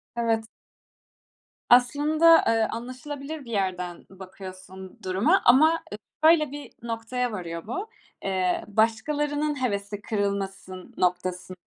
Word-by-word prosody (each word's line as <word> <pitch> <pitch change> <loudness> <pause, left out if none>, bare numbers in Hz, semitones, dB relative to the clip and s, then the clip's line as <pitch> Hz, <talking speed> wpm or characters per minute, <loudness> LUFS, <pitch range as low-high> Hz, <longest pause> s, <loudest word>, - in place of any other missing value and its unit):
Evet. 225 -1 0 1.2
Aslında, 300 +7 +5
eee, 225 -1 +3
anlaşılabilir 275 +5 -7
bir 235 - -9
yerden 180 -4 -2
bakıyorsun 190 0 -11
duruma 215 - +2
ama 315 +7 +5 0.4
şöyle 310 -3 +5
bir 290 0 -8
noktaya 235 +2 -3
varıyor 170 -3 -6
bu. 385 - -4 0.3
Eee, 185 -2 0
başkalarının 290 +7 0
hevesi 200 -2 -3
kırılmasın 195 -3 -4
noktası, 180 0 -1
225 Hz, 100 wpm, -26 LUFS, 190-285 Hz, 1.2 s, Aslında